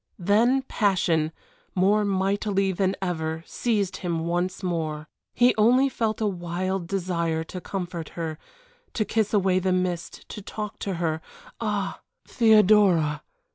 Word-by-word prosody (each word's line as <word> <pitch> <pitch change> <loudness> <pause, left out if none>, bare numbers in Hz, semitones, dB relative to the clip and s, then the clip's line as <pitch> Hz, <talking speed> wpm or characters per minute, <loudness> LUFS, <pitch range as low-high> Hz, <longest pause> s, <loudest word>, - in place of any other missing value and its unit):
Then 225 +8 +3
passion 175 -9 +1 0.4
more 200 +3 +3
mighty 195 0 +1
than 190 +1 0
ever 160 -3 -2
seized 210 -6 -1
him 170 -3 -2
once 175 +3 -1
more. 160 -3 -2 0.3
He 245 +1 +5
only 250 +5 +5
felt 220 -4 -1
a - - +2
wild 180 -1 -2
desire 170 -4 -1
to 180 +3 -8
comfort 175 -4 -5
her, 160 -2 -4 0.6
to 215 - +1
kiss 220 -1 0
away 190 -3 +3
the 185 0 0
mist 180 -2 -2
to 210 - -7
talk 210 +1 -6
to 195 -2 -3
her. 160 -2 -1 0.4
Ah! 205 -3 -2 0.3
"Theodora!" 210 -8 +4
190 Hz, 135 wpm, -25 LUFS, 170-210 Hz, 0.6 s, He